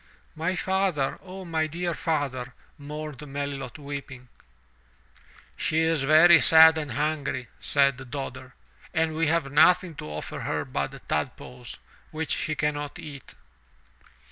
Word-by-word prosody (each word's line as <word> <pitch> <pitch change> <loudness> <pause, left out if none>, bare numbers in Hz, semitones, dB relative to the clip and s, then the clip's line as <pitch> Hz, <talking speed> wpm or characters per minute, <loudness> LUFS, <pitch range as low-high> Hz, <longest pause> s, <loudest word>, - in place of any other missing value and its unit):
''My 165 +4 -1
father, 190 -8 0
O 190 0 -9
my 160 -2 0
dear 170 +2 -3
father!" 135 -7 -2 0.2
mourned 150 0 -7
Melilot 140 -1 -5
weeping, 140 -3 -8 1.3
"She 160 +1 0
is 160 -4 +1
very 160 +3 +7
sad 160 0 +8
and 145 -5 -5
hungry," 140 -2 -2
said 140 -2 +1
Dodder, 130 -1 -6 0.4
"and 160 -1 +1
we 165 0 +1
have 155 -3 0
nothing 165 +4 +4
to 75 - -7
offer 75 0 -6
her - - -2
but - - -5
tadpoles, 120 +10 -4 0.3
which 160 0 -4
she 155 - -2
cannot 145 -1 -2
eat." 140 -4 -10
150 Hz, 125 wpm, -26 LUFS, 135-160 Hz, 1.3 s, sad